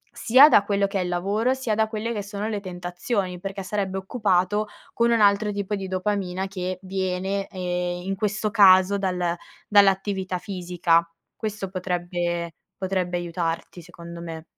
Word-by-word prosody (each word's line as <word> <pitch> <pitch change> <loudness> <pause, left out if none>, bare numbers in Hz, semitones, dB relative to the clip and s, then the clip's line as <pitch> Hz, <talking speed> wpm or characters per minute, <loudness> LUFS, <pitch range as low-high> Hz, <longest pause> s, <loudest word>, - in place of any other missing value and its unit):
sia 260 +5 +7
da 205 - +6
quello 200 -1 +1
che 195 0 -2
è - - 0
il 180 - -3
lavoro, 200 +8 0
sia 260 -5 -2
da 220 0 +1
quelle 225 +1 -3
che 210 -2 -3
sono 205 +1 -4
le 210 -2 -3
tentazioni, 180 +1 -3
perché 195 0 -5
sarebbe 195 -1 -2
occupato 200 0 0 0.3
con 235 0 +2
un 230 - +3
altro 205 0 +4
tipo 205 0 -2
di 195 -1 -5
dopamina 190 -1 -2
che 185 -1 -4
viene, 190 +1 -2
ehm, 180 -1 -3
in 195 +1 -2
questo 210 +2 -1
caso, 195 -2 +6
dal 180 -3 -1 0.3
dall'attività 195 -2 +3
fisica. 175 -3 +1 0.3
Questo 215 -2 -4
potrebbe 175 -2 -2 0.2
potrebbe 185 -2 -1
aiutarti 170 0 -4
secondo 170 0 -10
me. 165 -2 -7
190 Hz, 155 wpm, -24 LUFS, 180-205 Hz, 0.3 s, sia